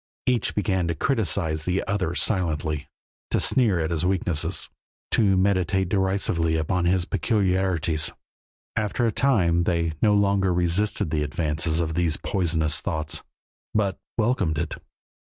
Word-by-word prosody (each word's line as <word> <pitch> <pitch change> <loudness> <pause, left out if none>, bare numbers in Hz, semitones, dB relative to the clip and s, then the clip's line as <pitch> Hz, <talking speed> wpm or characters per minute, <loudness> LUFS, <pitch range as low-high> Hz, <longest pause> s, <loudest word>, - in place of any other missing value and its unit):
Each 125 -3 +1
began 95 -3 0
to 85 - -1
criticize 90 - 0
the 90 +1 0
other 95 -4 -1
silently, 80 -7 0 0.4
to - - +1
sneer 115 -9 +3
at 80 0 -1
his 85 -1 -1
weaknesses, 90 -2 -1 0.4
to 100 -4 +3
meditate 95 -1 +1
derisively 95 -4 +1
upon 85 +3 0
his 90 0 +2
peculiarities. 90 -8 0 0.7
After 110 +3 0
a 115 - +2
time 90 -10 +2
they 85 -2 0
no 105 -2 +4
longer 100 -2 +2
resisted 90 0 0
the 80 -2 0
advance 80 +2 0
of 80 -2 -1
these 85 -2 +1
poisonous 80 -5 0
thoughts, 80 -4 -3 0.5
but 100 -3 0 0.2
welcomed 105 -9 +1
it. 80 +2 -2
90 Hz, 135 wpm, -24 LUFS, 80-100 Hz, 0.7 s, no